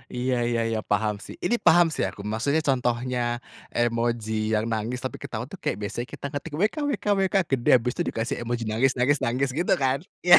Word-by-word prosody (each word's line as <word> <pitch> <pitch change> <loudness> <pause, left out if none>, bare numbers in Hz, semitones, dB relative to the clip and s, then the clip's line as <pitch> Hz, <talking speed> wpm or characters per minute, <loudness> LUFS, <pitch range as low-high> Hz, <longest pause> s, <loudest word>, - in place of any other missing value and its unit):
Iya 125 +1 0
iya 120 -1 +1
iya, 110 -1 0
paham 105 +1 +2
sih, - - -9
ini 240 - +3
paham 175 +1 +7
sih - - 0
aku. - - -8
Maksudnya, 140 +8 +1
contohnya 125 -1 0 0.6
emoji 115 -1 0 0.2
yang 105 - +1
nangis, 115 +3 -2
tapi 130 - -4
ketawa 115 +1 -4
tuh 195 - -8
kayak - - 0
biasanya 110 +5 -3
kita - - -7
ketik 145 +2 -5
"wkwkwk" 210 - +1 0.2
gede, 125 -3 +1
biasanya 130 +8 -1
dikasih 115 +5 -1
emoji 120 0 -2
nangis 125 +5 +3
nangis 135 +3 +3
nangis, 130 +3 +1
gitu 175 - +3
kan, 130 +1 +2 0.3
iya. 175 -1 +10
125 Hz, 185 wpm, -26 LUFS, 115-145 Hz, 0.6 s, iya